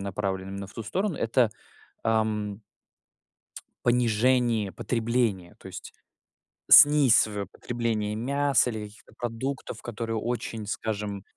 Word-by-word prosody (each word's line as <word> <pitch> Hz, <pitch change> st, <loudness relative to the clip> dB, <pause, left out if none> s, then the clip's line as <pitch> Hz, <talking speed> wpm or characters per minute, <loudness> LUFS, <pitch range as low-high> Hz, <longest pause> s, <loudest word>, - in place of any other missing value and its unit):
направлен 95 Hz, -1 st, -3 dB
именно 100 Hz, 0 st, -6 dB
в 100 Hz, -, -17 dB
ту 115 Hz, -, -5 dB
сторону, 185 Hz, -, -2 dB
это, 115 Hz, 0 st, +2 dB, 0.5 s
ам 110 Hz, -2 st, 0 dB, 1.2 s
понижение 120 Hz, -2 st, +2 dB
потребления, 115 Hz, -5 st, -1 dB
то -, -, -11 dB
есть -, -, -9 dB, 0.8 s
снисовое 120 Hz, -8 st, +6 dB
потребление 115 Hz, -3 st, -3 dB
мяса, 140 Hz, +2 st, +2 dB
или 110 Hz, -3 st, -5 dB
каких-то 105 Hz, +1 st, -19 dB
продуктов, 120 Hz, 0 st, -4 dB
которые 115 Hz, -1 st, -4 dB
очень, 115 Hz, -1 st, -4 dB
скажем, 105 Hz, -2 st, -4 dB
115 Hz, 105 wpm, -26 LUFS, 105-120 Hz, 1.2 s, снисовое